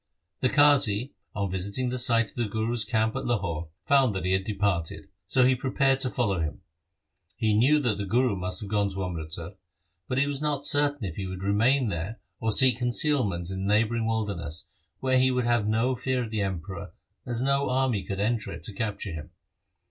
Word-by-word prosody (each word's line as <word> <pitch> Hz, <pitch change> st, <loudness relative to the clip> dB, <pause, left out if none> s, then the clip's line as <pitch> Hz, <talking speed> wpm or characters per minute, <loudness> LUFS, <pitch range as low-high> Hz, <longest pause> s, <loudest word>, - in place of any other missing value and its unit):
The 130 Hz, -, +2 dB
Qazi, 140 Hz, -5 st, +4 dB, 0.2 s
on 100 Hz, -2 st, -2 dB
visiting 100 Hz, +7 st, -1 dB
the 125 Hz, -, -1 dB
site 115 Hz, -3 st, +3 dB
of -, -, -25 dB
the 120 Hz, -2 st, -1 dB
Guru's 110 Hz, +2 st, -1 dB
camp 110 Hz, -1 st, 0 dB
at -, -, -3 dB
Lahore, 90 Hz, -9 st, -1 dB, 0.2 s
found 130 Hz, -3 st, +3 dB
that 95 Hz, -1 st, -3 dB
he 95 Hz, -, +1 dB
had 95 Hz, 0 st, +1 dB
departed, 100 Hz, -5 st, -2 dB, 0.2 s
so 130 Hz, +4 st, +4 dB
he 130 Hz, -, +5 dB
pre 130 Hz, +1 st, -3 dB
pared 135 Hz, 0 st, +2 dB
to 130 Hz, -, +1 dB
follow 105 Hz, -8 st, 0 dB
him. 80 Hz, -2 st, -3 dB, 0.8 s
He 110 Hz, -3 st, +1 dB
knew 130 Hz, +8 st, +5 dB
that 115 Hz, -6 st, 0 dB
the 100 Hz, -, -3 dB
Guru 120 Hz, +1 st, +2 dB
must 90 Hz, +1 st, -3 dB
nave 100 Hz, -, -8 dB
gone 105 Hz, -1 st, +2 dB
to 95 Hz, -1 st, -4 dB
Amritsar, 85 Hz, -1 st, -5 dB, 0.6 s
but 130 Hz, -, -2 dB
he 140 Hz, -, +3 dB
was 145 Hz, 0 st, -3 dB
not 145 Hz, -2 st, -1 dB
certain 145 Hz, -4 st, +1 dB
if 85 Hz, -4 st, -6 dB
he 95 Hz, -2 st, -3 dB
would 95 Hz, 0 st, -6 dB
remain 115 Hz, +6 st, +2 dB
there 90 Hz, +6 st, -4 dB, 0.2 s
or 110 Hz, -, 0 dB
seek 130 Hz, +1 st, +5 dB
concealment 120 Hz, -, +1 dB
in 95 Hz, -, -4 dB
the 105 Hz, -, +3 dB
neighbouring 115 Hz, +1 st, +1 dB
wilderness, 100 Hz, -8 st, -3 dB, 0.4 s
where 130 Hz, -1 st, +3 dB
he 130 Hz, 0 st, +4 dB
would 125 Hz, -1 st, 0 dB
have 120 Hz, -3 st, +2 dB
no 115 Hz, +4 st, +2 dB
fear 130 Hz, 0 st, -1 dB
of 110 Hz, -, -7 dB
the 110 Hz, -2 st, -1 dB
Emperor, 95 Hz, -2 st, -4 dB, 0.3 s
as 120 Hz, -2 st, -2 dB
no 140 Hz, 0 st, +1 dB
army 130 Hz, -5 st, +1 dB
could 100 Hz, -1 st, -5 dB
enter 110 Hz, +1 st, -1 dB
it 85 Hz, -2 st, -8 dB
to 105 Hz, -, -7 dB
capture 105 Hz, -1 st, -3 dB
him. 80 Hz, -2 st, -7 dB
110 Hz, 210 wpm, -27 LUFS, 95-130 Hz, 0.8 s, he